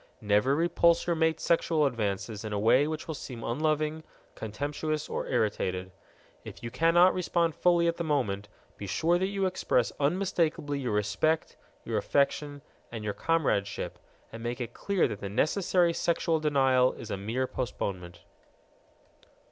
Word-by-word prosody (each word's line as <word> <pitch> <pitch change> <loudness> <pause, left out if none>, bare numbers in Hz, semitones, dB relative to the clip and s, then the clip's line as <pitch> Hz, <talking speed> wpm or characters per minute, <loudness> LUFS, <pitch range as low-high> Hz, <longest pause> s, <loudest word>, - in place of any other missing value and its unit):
Never 105 +6 +2
repulse 170 +1 +3
your 170 - +1
mate's 160 0 +1
sexual 165 -2 +2
advances 110 -3 -2
in 110 - -5
a - - 0
way 125 +7 +4
which 155 0 -5
will 160 - -3
seem 125 -5 -8
unloving, 155 +4 -1 0.3
contemptuous, 145 +7 -3
or - - -3
irritated. 95 -6 -1 0.5
If - - -10
you 115 - -5
cannot 165 +6 +5
respond 170 -2 0
fully 170 +1 +3
at 170 - 0
the 170 - -2
moment, 105 -10 -1 0.3
be 100 - -6
sure 165 - +1
that 190 - +1
you 195 -1 -1
express 125 -9 +1
unmistakably 155 -2 0
your 125 -5 -2
respect, 105 +10 0 0.3
your - - 0
affection, 145 0 0 0.3
and 115 -2 -6
your 105 -1 -2
comradeship, 135 -12 -1 0.3
and 115 - -8
make 120 +2 -3
it 120 -1 -5
clear 200 -3 +1
that 100 - -6
the 100 - -5
necessary 170 - +2
sexual 165 -1 +1
denial 135 -4 +3
is 110 - -9
a - - 0
mere 115 +7 -2
postponement. 90 -9 -5
145 Hz, 155 wpm, -29 LUFS, 110-165 Hz, 0.5 s, cannot